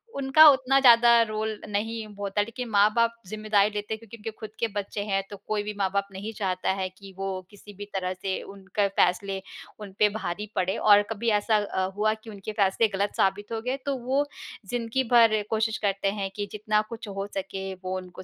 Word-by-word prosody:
उनका 275 +3 +6
उतना 270 0 +3
ज़्यादा 235 -2 +7
रोल 215 0 -3
नहीं 220 +2 -2
होता 200 0 -1
लेकिन 230 +3 -5
माँ-बाप 220 +3 +3
ज़िम्मेदारी 215 -1 +2
लेते 210 +1 -4
हैं। 220 - -5
क्योंकि 230 0 -12
उनके 225 0 -6
खुद 220 - -7
के 230 - +1
बच्चे 205 0 -3
हैं 195 -1 0
तो 205 - -8
कोई 210 -1 -1
भी 210 0 -4
माँ-बाप 200 0 0
नहीं 200 +3 -6
चाहता 190 -3 -1
है 190 -1 -2
कि 195 +1 -14
वो 195 -1 -3
किसी 205 0 -14
भी 205 - -6
तरह 185 -1 -1
से 190 +1 -3
उनके 200 +1 -2
फ़ैसले, 195 0 +1 0.4
उन 205 -2 -8
पे 210 - +5
भारी 205 -1 -4
पड़े। 185 +1 0
और 205 -1 +6
कभी 225 +1 -1
ऐसा 215 +1 +1
अ, 200 -2 -1
हुआ 215 +1 +2
कि 220 +1 -12
उनके 205 0 -7
फ़ैसले 205 +1 +2
गलत 200 +1 -1
साबित 205 +3 +1
हो 225 - -2
गए 255 +3 -2
तो 280 -1 0
वो 275 +3 +2 0.4
ज़िंदगी 245 +2 -1
भर 225 -3 +6
कोशिश 220 0 0
करते 195 -1 -1
हैं 200 -1 -3
कि 205 - -2
जितना 215 0 +1
कुछ 230 -1 -7
हो 195 0 -4
सके, 195 0 -4
वो 185 0 -5
उनको 185 0 -9
210 Hz, 205 wpm, -26 LUFS, 195-225 Hz, 0.4 s, ज़्यादा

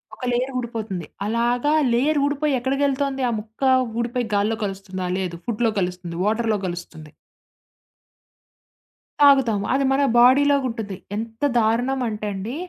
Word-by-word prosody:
ఒక 255 - -7
లేయర్ 250 +2 0
ఊడిపోతుంది. 220 -8 -4 0.2
అలాగా 240 +6 +1 0.2
లేయర్ 290 +5 +2
ఊడిపోయి 290 0 0
ఎక్కడికెళ్తోంది 275 +1 0
ఆ - - -1
ముక్క? 220 +4 -14 0.4
ఊడిపోయి 245 +1 -2
గాల్లో 215 +2 +1
కలుస్తుందా? 190 -2 -5
లేదు. 180 -3 -3
ఫుడ్‌లో 230 -1 0
కలుస్తుంది, 180 -2 -4
వాటర్‌లో 220 0 +1
కలుస్తుంది. 170 -3 -8 2.1
తాగుతాము. 260 -8 +5
అది 275 +1 +2
మన 280 - +2 0.2
బాడీలో 280 +4 +6
ఉంటది. 215 -5 -5 0.2
ఎంత 225 +4 -6 0.2
దారుణం 245 +4 +1
అంటే 210 0 -4
అండి, 210 +7 -5
230 Hz, 125 wpm, -22 LUFS, 205-265 Hz, 2.1 s, బాడీలో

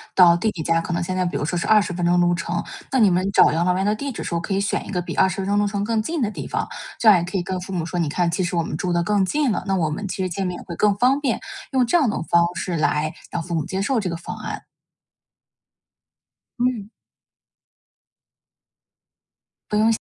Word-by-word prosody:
到 175 -2 +7
弟 215 +6 0
弟 170 -6 -5
家， 165 +1 +2
可 170 - -5
能 170 - -1
现 185 +2 -3
在 185 - +1
比 175 - -2
如 - - -2
说 175 +3 -1
是 170 - -2
20 210 -3 +4
分 175 0 -3
钟 175 +1 +3
路 175 0 +3
程， 170 0 -2 0.3
那 265 - +2
你 205 -4 +5
们 185 +3 +1
找 - - +6
养 165 +2 +1
老 180 0 +2
院 190 +1 0
的 210 - +2
地 275 +6 -4
址 - - -6
时 - - -4
候 170 - 0
可 170 - -7
以 - - +1
选 200 0 -1
一 - - -10
个 180 - -1
比 175 - -4
20 190 0 +2
分 195 - -2
钟 205 +1 +1
路 205 - +2
程 200 0 -2
更 225 +1 0
近 320 +7 -3
的 210 - 0
地 - - -6
方。 - - -2 0.3
这 230 - +1
样 200 -4 +8
也 170 - -2
可 180 +2 -3
以 175 - -1
跟 185 0 -3
父 190 - -8
母 175 -4 -2
说， 175 +1 -3
你 160 - 0
看 170 +3 0
其 180 +3 0
实 175 0 -2
我 170 - +1
们 155 - -4
住 180 +3 -2
得 170 0 +1
更 200 +1 +2
近 285 +6 +1
了， - - -2
那 195 - +1
我 165 -4 +1
们 200 +7 -4
其 190 0 -3
实 - - 0
见 190 +2 -2
面 180 - -4
也 - - -10
会 170 - -7
更 205 +3 +3
方 255 +7 +3
便， 260 -6 0 0.3
用 260 -3 +3
这 240 - 0
样 280 -8 +2
的 - - -2
方 170 0 +3
式 180 -1 -3
来 155 0 0 0.2
让 170 - -2
父 170 +1 -6
母 160 -2 0
接 190 - -3
受 230 +4 +1
这 190 - -2
个 170 - -3
方 165 - -7
案。 - - -6 2.0
嗯。 240 -5 0 2.8
不 210 - 0
用 220 +1 +4
谢。 - - +4
185 Hz, 285 characters per minute, -22 LUFS, 170-210 Hz, 2.8 s, 样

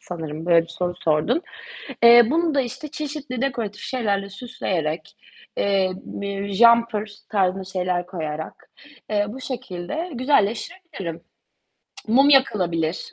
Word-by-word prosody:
sanırım, 160 -2 -6
böyle 170 -1 +5
bir 165 - -14
soru 175 +1 -3
sordun. 165 - +2 0.6
Eee, 235 0 +9
bunu 330 -1 +1
da 275 - +4
işte 255 +4 -6
çeşitli 290 -4 -5
dekoratif 230 -6 -2
şeylerle 200 -6 -1
süsleyerek, 180 -8 -4 0.4
eee, 195 -2 +2
bir 200 +1 -5
jumper 230 -1 +4 0.2
tarzında 190 -2 +1
şeyler 180 -1 -2
koyarak, 160 -4 -6 0.4
eee, 205 -1 +1
bu 260 +5 -8
şekilde 255 - -5
güzelleştirebilirim. 240 - -1 0.9
Mum 270 +6 +5
yakılabilir 180 - +2
200 Hz, 115 wpm, -23 LUFS, 180-255 Hz, 0.9 s, Eee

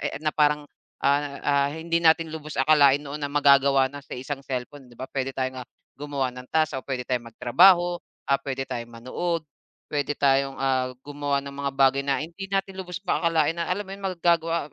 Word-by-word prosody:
eh, - - -6
na 155 - +2
parang, 150 0 +2 0.4
ah, 140 0 +1
ah, 140 -1 +2
hindi 165 +1 -1
natin 165 0 +4
lubos 155 -1 -7
akalain 145 -1 +5
noon 145 0 -6
na 145 - -2
magagawa 140 -2 +5
na 145 - -8
sa - - -8
isang 135 +2 -5
cellphone, 130 +2 -5
'di 120 - -17
ba? 130 - -7
Puwede 135 -1 -2
tayong, 130 0 -2
ah, - - -57 0.3
gumawa 140 -3 -2
ng 125 0 -11
task 155 -4 +2
o - - -6
puwede 130 -2 -3
tayong 125 -2 -2
magtrabaho, 175 +8 +5 0.3
ah, 140 - +4
puwede 135 -1 -4
tayong 120 0 -5
manood, 155 +8 -3 0.4
puwede 145 0 -2
tayong, 135 -1 +2
ah, 130 -1 +1 0.2
gumawa 145 -1 -1
ng 140 - -7
mga 140 0 -3
bagay 135 0 +4
na 140 0 0
hindi 195 +4 -9
natin 195 0 -1
lubos 180 -1 -6
pa 185 -1 -1
akalain 165 -1 +2
na 170 0 -3
alam 205 +3 -1
mo 190 - -10
yun? 195 - -10
Magagawa 170 -4 +1
145 Hz, 205 wpm, -25 LUFS, 135-165 Hz, 0.4 s, akalain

